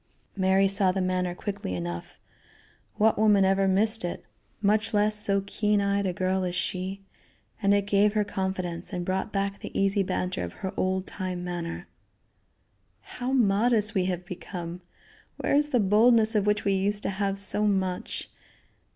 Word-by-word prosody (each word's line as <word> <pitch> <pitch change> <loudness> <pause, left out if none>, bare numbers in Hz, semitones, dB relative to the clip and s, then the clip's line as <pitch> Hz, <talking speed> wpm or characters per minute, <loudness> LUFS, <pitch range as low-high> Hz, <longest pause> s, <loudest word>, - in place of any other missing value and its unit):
Mary 190 0 +3
saw 195 -1 +2
the 190 - -2
manner 185 -1 -1
quickly 200 - -4
enough 85 -1 -6 0.8
what 215 0 +2
woman 210 -3 +5
ever 195 0 +2
missed 215 +3 +2
it, 175 - -5 0.3
much 210 +1 +1
less 210 +1 +3
so 200 -2 +3
keen 210 +1 +1
eyed 200 0 0
a - - 0
girl 185 +1 -1
as 180 -1 -2
she 190 +2 -3 0.6
and 200 -1 +3
it 200 -1 +3
gave 205 +1 +3
her 210 -1 +2
confidence, 190 -3 -4
and 175 -1 -3
brought 190 +3 -2
back 200 0 -2
the - - -5
easy 195 +1 +2
banter 185 - -2
of 85 - -6
her 190 - -5
old 185 0 -1
time 185 -2 -5
manner. 175 -1 -5 1.1
"How 250 +1 -5
modest 220 -2 +2
we 190 -4 +1
have 180 -1 -3
become! 175 -1 -7 0.6
Where - - -1
is 295 +1 +3
the 250 - +2
boldness 220 +2 +4
of 210 -2 +1
which 210 0 +1
we 200 - +2
used 205 +2 0
to - - -1
have 195 0 -2
so 205 +1 +3
much? 190 -3 -2
195 Hz, 170 wpm, -27 LUFS, 185-210 Hz, 1.1 s, woman